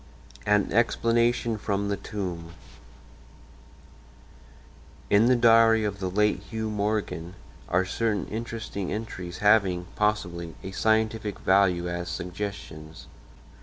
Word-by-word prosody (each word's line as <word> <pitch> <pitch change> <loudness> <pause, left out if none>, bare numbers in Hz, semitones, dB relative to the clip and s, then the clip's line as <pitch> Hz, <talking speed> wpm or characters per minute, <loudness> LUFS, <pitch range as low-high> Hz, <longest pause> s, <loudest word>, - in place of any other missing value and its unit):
IV 70 -3 -21
AN 105 -1 +2
EXPLANATION 115 0 +2
FROM 100 0 -1
THE 100 - 0
TOMB 90 -5 -6 2.6
In 105 +3 +5
the 130 - +5
diary 115 -1 +5
of 100 -1 -3
the 95 -1 -2
late 105 +3 +2
Hugh 110 -1 -4
Morgan 100 -4 -2 0.3
are 95 +2 +2
certain 105 0 -1
interesting 110 -3 -5
entries 90 -5 -5
having, 95 -4 +4
possibly, 85 -6 -1
a 95 - -6
scientific 110 0 0
value 95 -2 +2
as 85 0 -4
suggestions. 85 -5 -6
100 Hz, 110 wpm, -26 LUFS, 90-110 Hz, 2.6 s, In